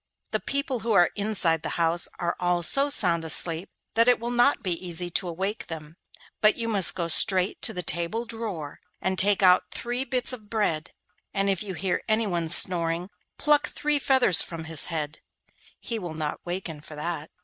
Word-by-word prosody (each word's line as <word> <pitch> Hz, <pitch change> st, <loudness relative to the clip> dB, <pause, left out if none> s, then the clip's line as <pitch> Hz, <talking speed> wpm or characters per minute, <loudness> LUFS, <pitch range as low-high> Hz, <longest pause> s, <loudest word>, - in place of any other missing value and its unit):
The -, -, -1 dB
people 275 Hz, -3 st, -2 dB
who 225 Hz, 0 st, -2 dB
are 175 Hz, -3 st, +4 dB
inside 195 Hz, -6 st, 0 dB
the 160 Hz, -, -5 dB
house 170 Hz, 0 st, +1 dB
are 170 Hz, -1 st, -3 dB
all 175 Hz, -1 st, 0 dB
so 275 Hz, -, +4 dB
sound 175 Hz, -, +4 dB
asleep 165 Hz, +2 st, +4 dB, 0.2 s
that 230 Hz, +1 st, +2 dB
it 245 Hz, -, +4 dB
will 235 Hz, +1 st, -4 dB
not 245 Hz, +4 st, +2 dB
be 185 Hz, -, -2 dB
easy 175 Hz, 0 st, -2 dB
to 180 Hz, -, -1 dB
awake 190 Hz, +5 st, -4 dB
them; 160 Hz, -1 st, -9 dB, 0.5 s
but 215 Hz, 0 st, +4 dB
you 230 Hz, -, -3 dB
must 200 Hz, -5 st, +4 dB
go 170 Hz, -2 st, -3 dB
straight 185 Hz, +3 st, +2 dB
to -, -, 0 dB
the 180 Hz, -, -5 dB
table 175 Hz, +9 st, -2 dB
drawer, 210 Hz, -11 st, -7 dB, 0.2 s
and 190 Hz, 0 st, -1 dB
take 200 Hz, 0 st, +4 dB
out 180 Hz, 0 st, +5 dB
three 245 Hz, +2 st, -3 dB
bits 255 Hz, -1 st, -1 dB
of 215 Hz, -4 st, -10 dB
bread, 185 Hz, -8 st, -2 dB, 0.5 s
and 195 Hz, 0 st, +1 dB
if 190 Hz, -, -3 dB
you 195 Hz, -3 st, -6 dB
hear 180 Hz, +2 st, -2 dB
anyone 195 Hz, -7 st, 0 dB
snoring, 170 Hz, +1 st, +4 dB, 0.3 s
pluck 295 Hz, 0 st, +2 dB
three 295 Hz, -1 st, -1 dB
feathers 260 Hz, -10 st, +3 dB
from 165 Hz, -1 st, -6 dB
his 160 Hz, -1 st, 0 dB
head; 155 Hz, -3 st, -5 dB, 0.6 s
he 230 Hz, -2 st, -5 dB
will 175 Hz, -5 st, -7 dB
not 155 Hz, -1 st, -5 dB
waken 175 Hz, -4 st, -6 dB
for 155 Hz, 0 st, -12 dB
that. 155 Hz, 0 st, -5 dB
185 Hz, 190 wpm, -25 LUFS, 165-225 Hz, 0.6 s, out